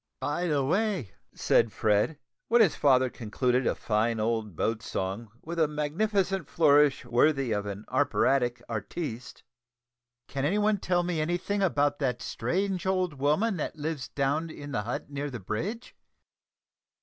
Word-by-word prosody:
"By 170 +5 -1
the 145 -4 +1
way," 185 - 0 0.2
said 115 -1 +3
Fred, 105 +10 +1 0.3
when 240 - +4
his 205 -8 +5
father 130 -3 +4
concluded 125 +2 0
a - - +1
fine 110 +1 0
old 110 -3 -1
boat 110 +6 -1
song 100 +4 -4
with 170 +1 -5
a 160 - +4
magnificent 185 +4 -1
flourish 145 -4 +4
worthy 130 +1 +2
of 105 -1 -1
an 100 +1 -6
operatic 130 -2 +1
artiste, 115 - -5 0.8
"can 135 -1 -3
any 170 +8 +2
one 210 -1 +2
tell 175 -1 +1
me 175 -3 -1
any 175 +3 0
thing 200 +3 -2
about 145 -6 +1
the 130 -4 +1
strange 185 - -2
old 185 -3 +1
woman 175 +10 +2
that 155 - -3
lives 150 -3 -4
down 145 +4 -1
in 145 -2 -8
the 105 - -1
hut 120 +6 -5
near 145 +1 -3
the 125 -3 -6
bridge?" 180 - -4
145 Hz, 155 wpm, -28 LUFS, 120-175 Hz, 0.8 s, his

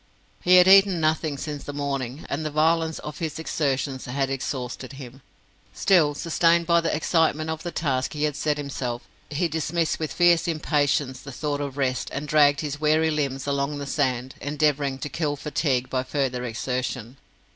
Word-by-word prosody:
He 180 +1 +5
had 180 0 +7
eaten 195 -2 +7
nothing 155 -2 0
since 145 0 -5
the 145 - -6
morning, 140 -1 -3
and 150 +3 -3
the 155 - -2
violence 160 +1 +1
of 150 -1 -8
his 155 -3 -3
exertions 140 -4 -2
had 135 +1 -1
exhausted 130 -1 -4
him. 135 -1 -10 0.5
Still, 160 -6 +3
sustained 170 +1 +2
by 170 0 +4
the 165 - 0
excitement 160 -1 +1
of 160 0 -4
the 175 - -4
task 135 -6 -1
he 150 -1 -3
had 150 -2 0
set 150 0 0
himself, 130 -4 -4 0.3
he 155 +4 0
dismissed 160 +1 -1
with 155 -2 -3
fierce 175 -1 +4
impatience 145 -4 0
the 140 - -9
thought 145 +2 -3
of 140 -1 -5
rest, 130 -2 -1
and 145 +1 -4
dragged 145 -1 +4
his 150 -1 -4
weary 155 +1 +3
limbs 140 -3 -2
along 140 +1 -1
the 140 - -5
sand, 130 -3 -1
endeavouring 145 -2 0
to 135 - -5
kill 150 0 -2
fatigue 140 -3 -1
by 130 - -1
further 130 -2 -2
exertion. 125 +1 -3
145 Hz, 180 wpm, -25 LUFS, 135-160 Hz, 0.5 s, had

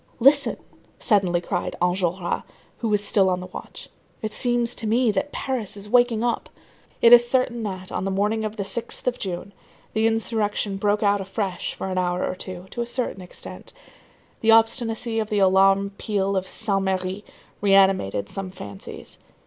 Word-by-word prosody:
"Listen," 275 +3 +4 0.4
suddenly 190 -6 +2
cried 175 - -3
Enjolras, 180 0 0 0.4
who 230 - -1
was 210 -1 +2
still 195 -2 +3
on 180 0 0
the 180 - -7
watch, - - -10 0.4
"it 215 -1 -3
seems 240 -1 +1
to 225 - -3
me 235 +1 +3
that 290 +7 -2
Paris 225 -6 -3
is 200 +1 -7
waking 240 0 +3
up." 240 -1 -1 0.5
It 235 0 +9
is 240 0 +7
certain 250 -2 +1
that, 185 -3 -5
on - - -2
the 195 - -1
morning 210 +3 0
of 215 +1 -4
the 200 - -1
6th 225 +4 -3
of 250 - 0
June, 190 +1 -5 0.4
the 220 +1 +3
insurrection 220 -3 0
broke 205 +1 +1
out 205 -1 +3
afresh 190 -1 -3
for - - -5
an 185 - 0
hour 180 0 0
or - - -2
two, 185 -1 -8
to 240 - -4
a 235 - -3
certain 240 -5 -2
extent. 180 - -9 0.7
The 225 - 0
obstinacy 225 0 +3
of 215 -1 -2
the 210 - 0
alarm 195 +1 +4
peal 200 -2 0
of 190 0 -1
Saint 200 -1 0
Merry 190 +1 -2 0.4
reanimated 190 - +3
some 195 - -5
fancies. 100 - -10
205 Hz, 175 wpm, -24 LUFS, 190-225 Hz, 0.7 s, It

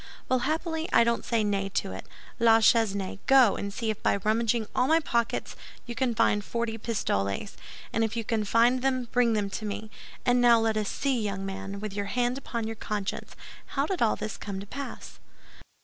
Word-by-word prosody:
Well, 255 - +2
happily, 320 0 -2
I - - +6
don't 235 0 0
say 230 -2 +1
nay 200 -1 0
to - - 0
it. - - -8 0.3
La 225 -1 +6
Chesnaye, 200 -4 +2
go 260 -6 +6
and 200 - -4
see 220 +1 -2
if 215 - -7
by - - +2
rummaging 220 +3 +1
all 250 - +3
my 320 +2 +5
pockets 235 -7 -1 0.3
you 240 - -5
can 235 0 0
find 210 -2 +2
forty 230 +1 -3
pistoles; 150 - -2 0.4
and 225 - +2
if 225 +1 -2
you 230 - -1
can 220 -1 -1
find 235 +4 +3
them, 255 -2 0
bring 245 -2 +3
them 205 -2 -1
to 215 - -5
me. 215 +1 -5 0.3
And 245 0 +4
now 235 -1 +6
let 225 -1 +1
us 215 -2 -1
see, 270 -4 0
young 195 -2 -3
man, 195 +1 -5
with 210 -1 -5
your 205 0 -2
hand 245 +4 0
upon 235 -4 -4
your 225 0 -5
conscience, 210 -2 -4 0.4
how 275 - +3
did 370 +2 -3
all 230 - +3
this 215 0 -5
come 200 -2 -5
to 200 - -7
pass?" 275 +6 -8
225 Hz, 205 wpm, -27 LUFS, 205-245 Hz, 0.4 s, I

